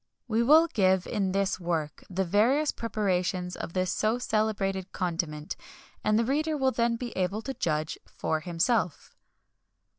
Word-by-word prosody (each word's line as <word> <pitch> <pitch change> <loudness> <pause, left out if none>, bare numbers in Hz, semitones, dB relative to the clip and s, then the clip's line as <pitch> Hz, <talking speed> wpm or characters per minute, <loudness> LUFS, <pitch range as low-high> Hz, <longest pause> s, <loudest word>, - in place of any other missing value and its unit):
We 225 0 +2
will 305 +7 +7
give, 190 - +2
in 195 -2 -1
this 195 0 0
work, 165 -4 -2
the 190 0 -1
various 240 - +3
preparations 185 -5 -1
of 165 - -6
this 185 -1 0
so 220 +2 +1
celebrated 205 -5 -1
condiment, 165 -4 -3 0.5
and 215 0 +3
the 230 - +2
reader 305 +4 0
will 265 -1 +2
then 235 0 +1
be 240 0 -5
able 190 +4 -1
to 270 - -4
judge 155 -8 -1
for 160 - -2
himself. 175 - -1
195 Hz, 150 wpm, -28 LUFS, 180-235 Hz, 0.5 s, will